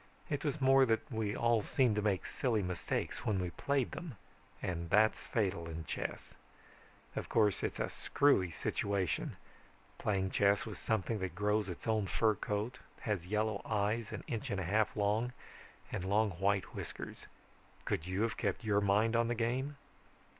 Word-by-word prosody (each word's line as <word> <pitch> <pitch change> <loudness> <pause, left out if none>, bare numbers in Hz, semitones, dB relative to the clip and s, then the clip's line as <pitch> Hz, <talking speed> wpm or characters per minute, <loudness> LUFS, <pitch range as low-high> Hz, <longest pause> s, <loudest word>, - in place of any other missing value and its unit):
It 145 -1 -1
was 150 0 -1
more 135 0 +6
that 115 +5 0
we 110 -3 -1
all 115 -1 +3
seemed 120 +1 +2
to - - +2
make 100 -3 +1
silly 115 -6 0
mistakes 90 -1 -2
when 105 -3 +1
we 90 -1 -2
played 140 +5 0
them 155 - -7 0.4
and 85 -2 -3
that's 110 +2 +4
fatal 95 -7 -1
in 80 0 -5
chess. - - -4 0.8
Of - - -4
course 105 -4 +3
it's - - -2
a - - +1
screwy 140 -11 +2
situation, 95 +2 -1 0.6
playing 95 -2 0
chess 100 0 +3
with 110 - -6
something 110 0 0
that 95 -1 -3
grows 105 -1 +1
its 90 - -7
own 110 -3 +1
fur 110 +4 +3
coat, 105 +4 -3 0.2
has 100 -6 -2
yellow 110 +2 0
eyes 110 +1 0
an - - -5
inch 115 -3 -3
and 100 - -1
a - - -1
half 105 +5 +1
long 105 +4 +1 0.6
and 90 - -2
long 105 +2 +2
white 95 +3 0
whiskers. - - -7 0.6
Could 80 - -1
you 95 +3 0
have 115 - -1
kept 105 -1 -1
your 105 -2 +2
mind 105 +3 +3
on 115 0 +3
the 120 - 0
game? 130 +5 -1
105 Hz, 170 wpm, -34 LUFS, 95-115 Hz, 0.8 s, more